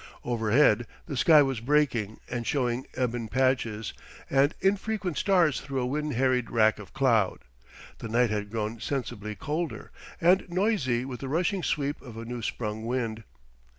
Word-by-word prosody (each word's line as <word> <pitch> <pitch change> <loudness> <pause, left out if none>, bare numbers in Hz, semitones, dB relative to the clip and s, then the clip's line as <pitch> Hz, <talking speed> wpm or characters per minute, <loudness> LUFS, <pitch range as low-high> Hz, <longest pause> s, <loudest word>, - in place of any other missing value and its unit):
Overhead 115 0 +3 0.2
the 145 - -5
sky 150 +3 +6
was 135 -3 -1
breaking 120 -5 +1
and 120 -2 -4
showing 125 -2 0
ebon 120 -2 -1
patches 115 -4 0 0.4
and 140 +3 +3
infrequent 195 -2 0
stars 170 - +3
through 135 -2 -3
a 125 - 0
wind 150 +3 -2
harried 125 -1 +1
wrack 110 -2 +3
of 105 - -11
cloud. 115 -8 +2 0.6
The 115 - -6
night 120 0 +2
had 105 -1 -2
grown 110 +1 -3
sensibly 115 -6 -4
colder, 155 +5 -4 0.3
and 180 +2 +3
noisy 175 - +1
with 130 -2 -6
the 135 - -5
rushing 180 +5 0
sweep 145 -3 -1
of 120 -4 -11
a 115 - -6
new 120 0 -5
sprung 110 0 -4
wind. 115 -3 -2
125 Hz, 155 wpm, -28 LUFS, 115-150 Hz, 0.6 s, sky